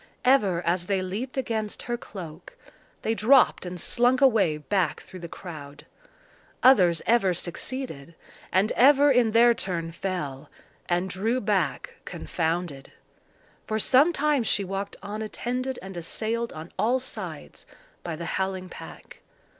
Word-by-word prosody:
Ever 205 Hz, -10 st, +3 dB
as 175 Hz, +1 st, 0 dB
they 195 Hz, -2 st, 0 dB
leaped 220 Hz, +9 st, -5 dB
against 220 Hz, -5 st, -2 dB
her 240 Hz, -, -2 dB
cloak, 180 Hz, -8 st, -10 dB, 0.5 s
they 225 Hz, -, +1 dB
dropped 225 Hz, -3 st, +4 dB
and 180 Hz, 0 st, -6 dB
slunk 245 Hz, +8 st, +3 dB
away 220 Hz, -, +4 dB
back 175 Hz, +1 st, 0 dB
through 185 Hz, -, -11 dB
the 170 Hz, -, -7 dB
crowd. 150 Hz, -5 st, -10 dB, 0.8 s
Others 185 Hz, -11 st, +5 dB
ever 210 Hz, -6 st, +3 dB
succeeded, 170 Hz, -, -5 dB, 0.4 s
and 190 Hz, +4 st, +2 dB
ever 285 Hz, +3 st, +6 dB
in 245 Hz, -3 st, +4 dB
their 235 Hz, +2 st, +6 dB
turn 170 Hz, -6 st, -3 dB
fell, 155 Hz, -6 st, -4 dB, 0.4 s
and 175 Hz, +1 st, +1 dB
drew 215 Hz, +7 st, -1 dB
back 195 Hz, -, -1 dB
confounded. 160 Hz, -4 st, -3 dB, 0.8 s
For 220 Hz, -, -1 dB
some 265 Hz, +9 st, +5 dB
time 300 Hz, -3 st, +1 dB
she 210 Hz, -3 st, +1 dB
walked 195 Hz, +1 st, -4 dB
on 210 Hz, +2 st, -5 dB
attended 250 Hz, +4 st, -3 dB
and 190 Hz, -1 st, -8 dB
assailed 225 Hz, +7 st, -3 dB
on 155 Hz, +2 st, -9 dB
all 245 Hz, +4 st, +2 dB
sides 260 Hz, -, -7 dB, 0.4 s
by 170 Hz, -2 st, -4 dB
the 170 Hz, +2 st, -6 dB
howling 190 Hz, 0 st, -2 dB
pack. -, -, -12 dB
195 Hz, 140 wpm, -26 LUFS, 175-240 Hz, 0.8 s, ever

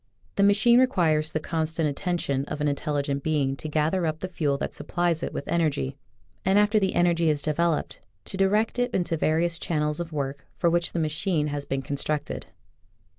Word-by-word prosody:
The -, -, +1 dB
machine 215 Hz, +4 st, +5 dB
requires 160 Hz, -11 st, +2 dB
the 155 Hz, -, -1 dB
constant 160 Hz, 0 st, -1 dB
attention 140 Hz, -2 st, -1 dB
of 150 Hz, 0 st, -5 dB
an 150 Hz, -, +1 dB
intelligent 140 Hz, -1 st, -1 dB
being 145 Hz, -3 st, 0 dB
to 155 Hz, -, -6 dB
gather 160 Hz, +4 st, +1 dB
up 155 Hz, 0 st, -1 dB
the 185 Hz, -, -3 dB
fuel 150 Hz, -6 st, 0 dB
that -, -, -4 dB
supplies 175 Hz, -2 st, -1 dB
it -, -, -3 dB
with -, -, -5 dB
energy, 150 Hz, -, 0 dB, 0.5 s
and, 190 Hz, +2 st, +3 dB
after 210 Hz, +1 st, +4 dB
the 190 Hz, -2 st, 0 dB
energy 170 Hz, -2 st, +3 dB
is 145 Hz, -2 st, +1 dB
developed, 160 Hz, +1 st, 0 dB, 0.3 s
to -, -, -6 dB
direct 210 Hz, +5 st, +2 dB
it 245 Hz, 0 st, +2 dB
into 175 Hz, -2 st, 0 dB
the -, -, +1 dB
various 165 Hz, +2 st, +1 dB
channels 150 Hz, -2 st, -1 dB
of 170 Hz, -1 st, -4 dB
work 140 Hz, -1 st, -4 dB
for 170 Hz, -, +2 dB
which 175 Hz, 0 st, 0 dB
the 170 Hz, -, -1 dB
machine 155 Hz, 0 st, 0 dB
has 145 Hz, -1 st, -3 dB
been 135 Hz, 0 st, -2 dB
constructed. 145 Hz, +2 st, -3 dB
160 Hz, 190 wpm, -26 LUFS, 150-175 Hz, 0.5 s, machine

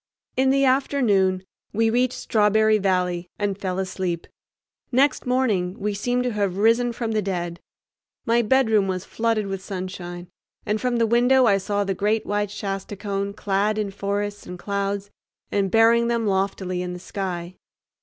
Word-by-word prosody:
In 265 Hz, +1 st, +3 dB
the 275 Hz, +1 st, +3 dB
afternoon 220 Hz, -9 st, +2 dB, 0.3 s
we 225 Hz, +1 st, +2 dB
reached 250 Hz, +2 st, +1 dB
Strawberry 215 Hz, 0 st, +3 dB
Valley 180 Hz, -2 st, 0 dB
and 205 Hz, -1 st, -1 dB
fell 185 Hz, -2 st, -3 dB
asleep. 185 Hz, -3 st, -2 dB, 0.7 s
Next 270 Hz, +1 st, +2 dB
morning 215 Hz, -8 st, 0 dB
we 210 Hz, +1 st, -1 dB
seemed 245 Hz, +5 st, 0 dB
to 250 Hz, -2 st, -1 dB
have 200 Hz, -3 st, -1 dB
risen 230 Hz, +3 st, +3 dB
from 230 Hz, -1 st, -3 dB
the 215 Hz, -1 st, +1 dB
dead. 175 Hz, -3 st, -3 dB, 0.7 s
My 235 Hz, +1 st, +3 dB
bedroom 220 Hz, -4 st, +3 dB
was 185 Hz, -1 st, -3 dB
flooded 225 Hz, -2 st, 0 dB
with 195 Hz, -1 st, -4 dB
sunshine, 180 Hz, -2 st, -6 dB, 0.4 s
and 210 Hz, +1 st, -1 dB
from 250 Hz, -1 st, 0 dB
the 230 Hz, -, +3 dB
window 245 Hz, +3 st, +4 dB
I 200 Hz, -3 st, +4 dB
saw 205 Hz, +1 st, -1 dB
the 195 Hz, -1 st, -1 dB
great 210 Hz, +4 st, 0 dB
white 205 Hz, 0 st, -1 dB
Shasta 195 Hz, 0 st, -4 dB
cone 200 Hz, 0 st, -3 dB
clad 205 Hz, +1 st, 0 dB
in 210 Hz, -2 st, -1 dB
forests 205 Hz, +1 st, -3 dB
and 180 Hz, -, -7 dB
clouds 200 Hz, +1 st, -3 dB, 0.4 s
and 200 Hz, -1 st, +1 dB
bearing 230 Hz, +2 st, +4 dB
them 235 Hz, -1 st, 0 dB
loftily 190 Hz, -2 st, -1 dB
in 180 Hz, 0 st, -4 dB
the 180 Hz, -, -7 dB
sky. 180 Hz, -2 st, -5 dB
205 Hz, 165 wpm, -23 LUFS, 190-230 Hz, 0.7 s, window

